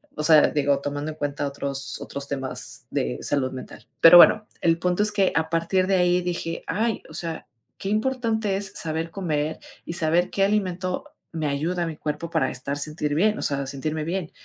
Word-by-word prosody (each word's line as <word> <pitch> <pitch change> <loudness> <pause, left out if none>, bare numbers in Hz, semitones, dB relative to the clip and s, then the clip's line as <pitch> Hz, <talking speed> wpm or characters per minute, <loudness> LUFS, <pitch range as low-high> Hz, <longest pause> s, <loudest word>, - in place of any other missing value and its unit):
O 150 - -2
sea, 155 -1 +7
digo, 140 -1 +1
tomando 145 +2 -4
en 155 - -11
cuenta 145 -1 -2
otros 140 0 -3
otros 140 0 -6
temas 135 -2 -4
de 60 0 -2
salud 140 -3 0
mental. 130 -1 -9 0.2
Pero 165 +1 +10
bueno, 210 +4 +7
el 165 -1 +3
punto 180 +3 +1
es 210 - 0
que 195 -2 +2
a 160 0 +1
partir 170 +3 +1
de 195 - +3
ahí 180 0 +3
dije: 175 -2 -3
"Ay, 220 +6 0
o - - -12
sea, 165 -2 -5 0.3
qué 195 - -4
importante 220 -2 0
es 195 0 -2
saber 160 +1 -2
comer, 155 -4 -2 0.3
y - - -5
saber 170 +1 +1
qué 195 - 0
alimento 190 +3 -1 0.3
me 160 -1 -3
ayuda 160 +5 -1
a - - -2
mi 160 - -5
cuerpo 150 +2 -4
para 155 -6 +1
estar 135 +2 -3
sentir 150 0 -2
bien, 210 +6 +2
o - - -4
sea, 140 -1 0
sentirme 155 +3 -3
bien", 170 +1 -3
165 Hz, 200 wpm, -24 LUFS, 145-185 Hz, 0.3 s, Pero